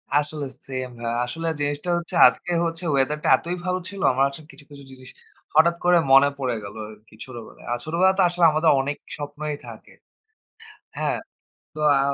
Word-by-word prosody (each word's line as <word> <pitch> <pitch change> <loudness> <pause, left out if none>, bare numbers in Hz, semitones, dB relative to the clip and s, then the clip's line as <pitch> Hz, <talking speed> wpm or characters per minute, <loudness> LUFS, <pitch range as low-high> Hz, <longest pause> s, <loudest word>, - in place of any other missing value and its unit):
আসলে 150 0 0 0.2
সেম 130 -1 -4
ভাইয়া 115 0 -3
আসলে 165 +7 -5
জিনিসটা 145 +4 -2
হচ্ছে 170 -1 -4
আজকে 125 +8 -2
হচ্ছে 165 +1 -3
ওয়েদারটা 145 +2 0
এতই 175 +2 -4
ভালো 185 0 0
ছিল। 200 -1 -8
আমার 130 +1 +1
হচ্ছে 140 +3 -8
কিছু, 140 +2 -15
কিছু 140 -1 -11
জিনিস 130 -1 -13 0.5
হঠাৎ 170 +2 +5
করে 175 0 +5
মনে 135 +1 +7
পড়ে 130 -4 -2
গেল 100 - -9
আরকি 110 0 -16
ছোটবেলায়। 120 -4 -11
আর 120 - 0
ছোটবেলায় 180 +4 +3
তো - - +4
আসলে 175 0 -1
আমাদের 155 +1 +2
অনেক 145 +2 -3 0.2
স্বপ্নই 150 +1 -5
থাকে। - - -12 1.1
হ্যাঁ, - - -1 0.6
তো 155 - -10 0.2
আ - - +2
145 Hz, 175 wpm, -23 LUFS, 130-165 Hz, 1.1 s, মনে